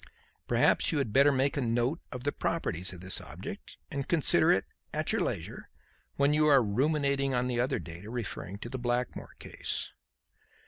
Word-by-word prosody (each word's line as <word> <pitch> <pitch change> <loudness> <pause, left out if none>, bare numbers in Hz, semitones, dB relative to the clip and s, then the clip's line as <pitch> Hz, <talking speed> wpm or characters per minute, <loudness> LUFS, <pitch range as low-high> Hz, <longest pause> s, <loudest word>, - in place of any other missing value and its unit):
Perhaps - - +3
you 160 - -1
had 130 -7 -1
better 140 +2 +6
make 135 +1 +1
a 140 - 0
note 120 +6 0
of 125 -2 -7
the 145 - 0
properties 90 - -2
of 90 -2 -10
this 95 0 -1
object, - - -9
and 140 -1 -4
consider 165 -4 +6
it - - +2 0.3
at - - 0
your - - 0
leisure - - -4 0.5
when 140 +1 +2
you 155 0 +3
are 140 -4 +6
ruminating 140 +4 0
on 125 0 +1
the 125 -1 -1
other 125 +2 +1
data 85 +5 -9
referring 110 -5 -5
to 110 - -8
the 130 - -5
Blackmore 120 0 -3
case." - - -5
130 Hz, 180 wpm, -29 LUFS, 115-140 Hz, 0.5 s, better